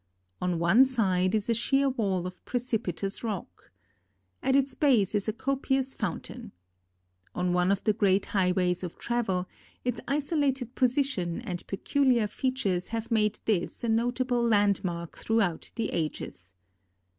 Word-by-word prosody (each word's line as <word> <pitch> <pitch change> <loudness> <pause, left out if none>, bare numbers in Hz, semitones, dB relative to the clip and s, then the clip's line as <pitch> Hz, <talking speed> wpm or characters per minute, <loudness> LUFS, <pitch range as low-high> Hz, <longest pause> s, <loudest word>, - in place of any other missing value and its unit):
On 180 -1 0
one 170 +9 +6
side 195 -7 +2
is 210 -2 -1
a 235 - +3
sheer 270 +4 +2
wall 200 -9 0
of 180 0 -8
precipitous 220 -6 -2
rock. 200 - -5 0.7
At 265 - +2
its 275 -1 +2
base 250 - +3
is 205 0 0
a - - +2
copious 265 +2 -1
fountain. 205 -9 -5 0.8
On 180 0 0
one 180 +1 +2
of 200 - 0
the 215 - +3
great 200 -2 +2
highways 180 -2 +1
of 175 - -6
travel, 195 -7 -1 0.4
its 245 -1 -1
isolated 280 -4 0
position 250 -9 0
and 180 -7 -5
peculiar 250 +3 +2
features 210 -6 -1
have 230 +1 -4
made 210 -2 +2
this 205 -1 -1
a 235 - 0
notable 245 +2 +1
landmark 200 -6 +1
throughout 205 -7 0
the 225 -3 -1
ages. 95 - -4
215 Hz, 140 wpm, -28 LUFS, 180-250 Hz, 0.8 s, one